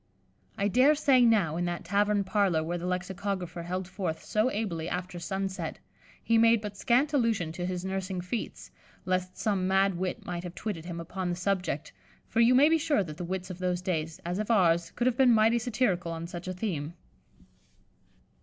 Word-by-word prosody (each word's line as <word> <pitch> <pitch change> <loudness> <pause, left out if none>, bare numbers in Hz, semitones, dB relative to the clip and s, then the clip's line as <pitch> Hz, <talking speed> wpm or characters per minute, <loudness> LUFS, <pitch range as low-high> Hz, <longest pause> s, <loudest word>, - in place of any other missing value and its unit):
I 200 - +1
dare 255 +8 +5
say 275 -4 +4
now, 200 -9 +3
in 175 - 0
that 175 0 -4
tavern 205 0 +2
parlour 190 -5 +1
where 175 +2 -3
the 175 - -4
lexicographer 185 0 -3
held 180 +2 -4
forth 180 -4 -4
so 215 +4 +1
ably 175 -8 -3
after 180 0 -4
sun 190 +3 -2
set, 190 +1 -5 0.5
he 230 -1 +3
made 230 0 +5
but 210 -1 -6
scant 255 +8 +2
allusion 225 - +1
to 175 +2 -4
his 180 0 -3
nursing 190 -1 -3
feats, 180 +6 -5 0.3
lest 185 0 -1
some 195 -4 0
mad 195 +1 +3
wit 185 -1 -3
might 175 -1 -4
have 175 -1 -7
twitted 185 -7 -4
him 170 -1 -5
upon 180 +2 -4
the 175 - -1
subject, 180 -5 -2 0.3
for 225 - -1
you 235 +2 +6
may 280 +3 +7
be 325 0 +3
sure 290 -8 +2
that 155 -4 -8
the 175 - -5
wits 185 +1 -4
of 180 - -8
those 180 -1 -1
days, 160 -3 -2
as 175 +3 -2
of 215 - -3
ours, 170 -6 +3
could 240 - -3
have 250 -1 +2
been 260 -2 +6
mighty 225 +2 +4
satirical 215 -8 0
on 165 0 -5
such 175 0 -7
a 185 - -2
theme. 175 -5 -3
185 Hz, 200 wpm, -29 LUFS, 175-215 Hz, 0.5 s, may